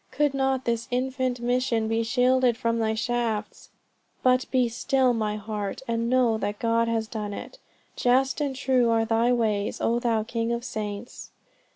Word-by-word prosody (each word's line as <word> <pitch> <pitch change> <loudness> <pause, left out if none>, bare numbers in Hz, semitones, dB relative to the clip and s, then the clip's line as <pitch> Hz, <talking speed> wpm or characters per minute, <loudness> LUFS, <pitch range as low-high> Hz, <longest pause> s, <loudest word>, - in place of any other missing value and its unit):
Could 285 +1 +1
not 265 -1 0
this 235 -1 -1
infant 255 0 -1
mission 245 -2 0
be 225 +1 +1
shielded 250 0 +2
from 230 -2 0
thy 220 -1 0
shafts!" 230 -2 -2 0.5
"But 255 0 +3
be 255 -2 +2
still, 255 +2 +1
my 215 -2 -1
heart, 210 +2 -5
and 230 0 -1
know 245 -3 +3
that 205 0 -2
God 230 +1 +1
has 225 -1 -1
done 210 -2 -5
it. - - -9 0.4
Just 260 +4 +2
and 280 -2 -1
true 255 -3 +2
are 225 -1 +2
thy 230 +2 +2
ways, 215 -4 0
oh 235 +1 +1
thou 230 -3 +1
King 230 +1 -2
of 235 0 -3
saints!" 210 0 -6
235 Hz, 170 wpm, -26 LUFS, 225-255 Hz, 0.5 s, But